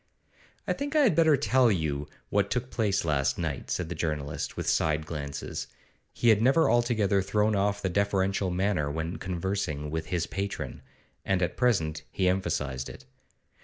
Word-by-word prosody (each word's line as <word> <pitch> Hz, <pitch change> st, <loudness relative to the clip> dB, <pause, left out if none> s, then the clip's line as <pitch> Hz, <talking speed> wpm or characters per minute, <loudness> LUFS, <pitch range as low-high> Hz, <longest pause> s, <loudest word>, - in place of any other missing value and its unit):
'I -, -, +2 dB
think 285 Hz, +2 st, -4 dB
I 305 Hz, -, +6 dB
had 240 Hz, -10 st, +5 dB
better 160 Hz, -3 st, +5 dB
tell 125 Hz, -1 st, +3 dB
you 75 Hz, -6 st, -1 dB, 0.2 s
what 100 Hz, 0 st, +1 dB
took 125 Hz, +3 st, -2 dB
place 100 Hz, -6 st, 0 dB
last 70 Hz, -4 st, +1 dB
night,' -, -, -3 dB
said 90 Hz, -, -1 dB
the 85 Hz, -, -4 dB
journalist, 75 Hz, -4 st, -3 dB
with -, -, -3 dB
side 75 Hz, 0 st, +1 dB
glances. 70 Hz, -3 st, -5 dB, 0.4 s
He 120 Hz, -, +2 dB
had 110 Hz, -2 st, +5 dB
never 135 Hz, +7 st, +4 dB
altogether 110 Hz, -5 st, +2 dB
thrown 105 Hz, +2 st, +1 dB
off 100 Hz, +1 st, 0 dB
the -, -, +1 dB
deferential 95 Hz, 0 st, +1 dB
manner 90 Hz, -4 st, 0 dB
when 80 Hz, +4 st, -3 dB
conversing 90 Hz, -5 st, -3 dB
with 80 Hz, 0 st, -3 dB
his 85 Hz, -3 st, -1 dB
patron, 100 Hz, +1 st, -4 dB, 0.4 s
and 95 Hz, -1 st, +1 dB
at 85 Hz, -, -1 dB
present 95 Hz, -11 st, +1 dB
he 95 Hz, -, 0 dB
emphasised 75 Hz, -8 st, -1 dB
it. 65 Hz, -, -11 dB
95 Hz, 165 wpm, -28 LUFS, 80-105 Hz, 0.4 s, I